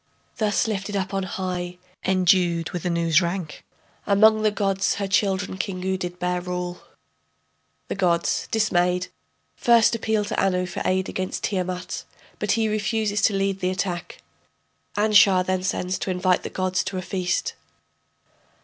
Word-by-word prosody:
Thus 215 Hz, -1 st, +1 dB
lifted 205 Hz, -1 st, -3 dB
up 190 Hz, 0 st, -2 dB
on 195 Hz, -, 0 dB
high, 180 Hz, -1 st, -4 dB, 0.3 s
endued 180 Hz, -2 st, +2 dB
with 180 Hz, 0 st, -3 dB
Anu's 170 Hz, -1 st, +3 dB
rank, 170 Hz, -2 st, -4 dB, 0.4 s
Among 215 Hz, +2 st, +5 dB
the 215 Hz, -, +4 dB
gods 195 Hz, -2 st, 0 dB
her 200 Hz, -1 st, -2 dB
children 195 Hz, -1 st, 0 dB
Kingu 190 Hz, -1 st, -2 dB
did 180 Hz, -1 st, -5 dB
bear 180 Hz, 0 st, -1 dB
rule. 180 Hz, 0 st, -4 dB, 1.1 s
[The -, -, -2 dB
gods, 175 Hz, -3 st, +1 dB
dismayed, 180 Hz, -4 st, +1 dB, 0.5 s
first 235 Hz, -1 st, +4 dB
appeal 220 Hz, -2 st, 0 dB
to -, -, -1 dB
Anu 180 Hz, -1 st, +1 dB
for 180 Hz, -, -5 dB
aid 185 Hz, 0 st, +1 dB
against 185 Hz, 0 st, -4 dB
Tiamat, 185 Hz, -2 st, -2 dB, 0.4 s
but 210 Hz, -, +1 dB
he 225 Hz, -1 st, +1 dB
refuses 215 Hz, -1 st, 0 dB
to 200 Hz, -, +3 dB
lead 195 Hz, 0 st, 0 dB
the 185 Hz, -1 st, 0 dB
attack. 180 Hz, -2 st, -4 dB, 0.7 s
Anshar 205 Hz, -3 st, +5 dB
then 185 Hz, 0 st, 0 dB
sends 185 Hz, -1 st, -2 dB
to -, -, -3 dB
invite 180 Hz, 0 st, +2 dB
the -, -, -5 dB
gods 185 Hz, 0 st, -1 dB
to 190 Hz, -, -3 dB
a 185 Hz, -, -3 dB
feast. 180 Hz, 0 st, -1 dB
185 Hz, 150 wpm, -24 LUFS, 180-200 Hz, 1.1 s, Among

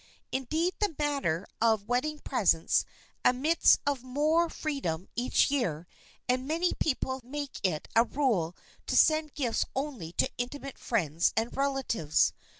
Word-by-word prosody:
Indeed 315 Hz, +7 st, 0 dB
the 410 Hz, -7 st, 0 dB
matter 275 Hz, -, 0 dB, 0.2 s
of 220 Hz, -3 st, +2 dB
wedding 255 Hz, +6 st, 0 dB
presents 195 Hz, -, +2 dB, 0.4 s
admits 290 Hz, +7 st, +4 dB
of 280 Hz, -3 st, 0 dB
more 305 Hz, +6 st, +1 dB
freedom 195 Hz, -, -3 dB
each 245 Hz, +3 st, +2 dB
year 180 Hz, -, -1 dB, 0.4 s
and 255 Hz, +1 st, 0 dB
many 335 Hz, +4 st, +1 dB
people 260 Hz, -2 st, -1 dB
make 285 Hz, +3 st, -6 dB
it 165 Hz, -5 st, -1 dB
a 230 Hz, -, +7 dB
rule 220 Hz, -, 0 dB, 0.3 s
to -, -, -1 dB
send 310 Hz, -2 st, +4 dB
gifts 250 Hz, -7 st, 0 dB
only 265 Hz, -, -4 dB
to -, -, +2 dB
intimate 275 Hz, +2 st, -5 dB
friends 170 Hz, -7 st, +1 dB
and 225 Hz, +2 st, 0 dB
relatives. 270 Hz, -, +1 dB
260 Hz, 135 wpm, -29 LUFS, 220-295 Hz, 0.4 s, a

